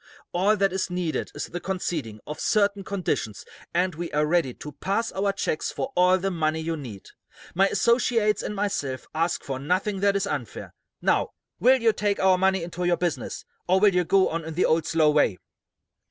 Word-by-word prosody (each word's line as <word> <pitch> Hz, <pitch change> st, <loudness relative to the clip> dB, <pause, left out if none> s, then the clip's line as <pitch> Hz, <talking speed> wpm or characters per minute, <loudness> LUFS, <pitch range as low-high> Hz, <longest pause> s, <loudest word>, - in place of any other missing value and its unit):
All 200 Hz, +4 st, +3 dB
that 195 Hz, -2 st, +2 dB
is 190 Hz, -1 st, -1 dB
needed 180 Hz, -3 st, -2 dB
is -, -, -3 dB
the 175 Hz, -, -6 dB
conceding 165 Hz, -, -4 dB
of 150 Hz, -, -7 dB
certain 200 Hz, -2 st, +1 dB
conditions, 185 Hz, -, -3 dB, 0.3 s
and 180 Hz, +1 st, +1 dB
we 170 Hz, +2 st, -5 dB
are 150 Hz, 0 st, +2 dB
ready 160 Hz, -4 st, +1 dB
to 150 Hz, -, -8 dB
pass 200 Hz, -, -2 dB
our 200 Hz, +1 st, 0 dB
checks 195 Hz, -5 st, -2 dB
for 270 Hz, -, -4 dB
all 180 Hz, +1 st, +5 dB
the 195 Hz, +1 st, -2 dB
money 160 Hz, -2 st, 0 dB
you 165 Hz, +1 st, -2 dB
need. 120 Hz, -10 st, -9 dB, 0.4 s
My 195 Hz, +3 st, +4 dB
associates 230 Hz, +1 st, +2 dB
and 210 Hz, -, -4 dB
myself 195 Hz, -11 st, -2 dB
ask 165 Hz, +2 st, 0 dB
for 135 Hz, -1 st, -4 dB
nothing 185 Hz, +7 st, -1 dB
that 200 Hz, 0 st, +2 dB
is 200 Hz, -, +1 dB
unfair. 135 Hz, -7 st, -5 dB, 0.3 s
Now, -, -, +2 dB, 0.3 s
will 260 Hz, +2 st, +5 dB
you 230 Hz, -2 st, +3 dB
take 205 Hz, -1 st, -1 dB
our 185 Hz, -1 st, +4 dB
money 190 Hz, -1 st, +2 dB
into 175 Hz, +1 st, -5 dB
your 175 Hz, -1 st, +2 dB
business, 175 Hz, -2 st, -3 dB, 0.2 s
or 185 Hz, +2 st, +4 dB
will 205 Hz, -1 st, +5 dB
you 180 Hz, 0 st, +3 dB
go 190 Hz, +2 st, +3 dB
on 165 Hz, 0 st, -3 dB
in 160 Hz, 0 st, -7 dB
the 180 Hz, -, +2 dB
old, 160 Hz, -1 st, +2 dB
slow 155 Hz, -2 st, +3 dB
way?" 145 Hz, -10 st, +2 dB
180 Hz, 195 wpm, -25 LUFS, 160-195 Hz, 0.4 s, all